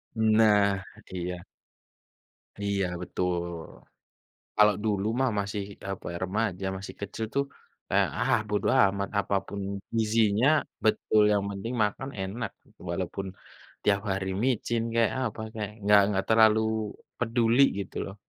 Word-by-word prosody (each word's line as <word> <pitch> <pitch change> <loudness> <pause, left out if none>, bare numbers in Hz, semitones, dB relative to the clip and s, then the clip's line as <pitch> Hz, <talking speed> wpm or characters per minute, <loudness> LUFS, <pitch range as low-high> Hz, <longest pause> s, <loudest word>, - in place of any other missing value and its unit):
Nah, 110 -3 +4 0.3
iya. 90 -1 -4 1.1
Iya, 100 -1 0 0.2
betul. 90 0 -1 1.2
Kalau 105 -1 +6
dulu 105 -2 0
mah 130 -1 +3
masih, 100 0 -3 0.3
apa 95 - -6
ya, - - -5
remaja 95 -1 -1
masih 95 +1 -8
kecil 100 +2 -4
tuh 140 0 +2 0.4
kayak, - - +3
ah, - - +3
bodo 105 -1 0 0.2
amat, 100 0 +1
apa 100 - 0
pun 100 0 -5 0.4
gizinya 110 +1 +3 0.4
betul, 110 0 +3
yang 100 -1 +2
penting 100 +5 -5
makan 130 +6 -3
enak 105 +4 -3
gitu. - - -27
Walaupun 95 +2 -3 0.6
tiap 100 -1 +3
hari 95 0 -1 0.2
micin 120 -2 0
kek, 115 -1 +4
apa 115 -4 -3
kek, 105 -2 -3
enggak 105 0 +6
enggak 95 -1 0
terlalu 110 -1 +6 0.6
peduli 120 +2 +3 0.2
gitu 95 - -8
loh. 95 - -7
105 Hz, 130 wpm, -28 LUFS, 100-110 Hz, 1.2 s, Kalau